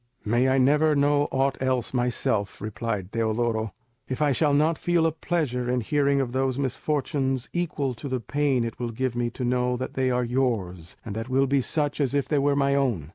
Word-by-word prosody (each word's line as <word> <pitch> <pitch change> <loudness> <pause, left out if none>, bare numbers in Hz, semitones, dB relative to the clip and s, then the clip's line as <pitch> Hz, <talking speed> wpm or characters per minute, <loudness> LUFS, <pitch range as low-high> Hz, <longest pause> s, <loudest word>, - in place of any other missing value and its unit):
"May 120 +4 +2
I 130 - +3
never 150 +4 +4
know 145 0 +3
aught 135 0 0
else 130 -2 0
myself," 120 -5 -1
replied 105 -2 -4
Teodoro, 110 -1 0 0.4
"if 130 - -3
I 150 -1 +3
shall 145 +3 +2
not 155 +2 +2
feel 175 -2 +2
a 165 - +3
pleasure 150 -7 -2
in 125 0 +1
hearing 140 +3 +1
of 130 -3 -1
those 130 0 0
misfortunes 135 -1 -1
equal 155 -6 -1
to 125 +4 -7
the 130 -1 -1
pain 135 +2 0
it 115 -1 -5
will 120 -1 -2
give 120 +1 -2
me 120 0 0
to 125 - -6
know 125 0 +1
that 130 - -5
they 130 -1 +1
are 125 0 +1
yours, 110 -9 -2
and 105 -3 -5
that 115 +3 -4
will 135 +1 +3
be 135 0 +2
such 145 +2 -1
as 140 0 0
if 140 - +1
they 150 - +1
were 140 0 +2
my 140 0 +2
own." 120 - 0
130 Hz, 210 wpm, -25 LUFS, 120-140 Hz, 0.4 s, never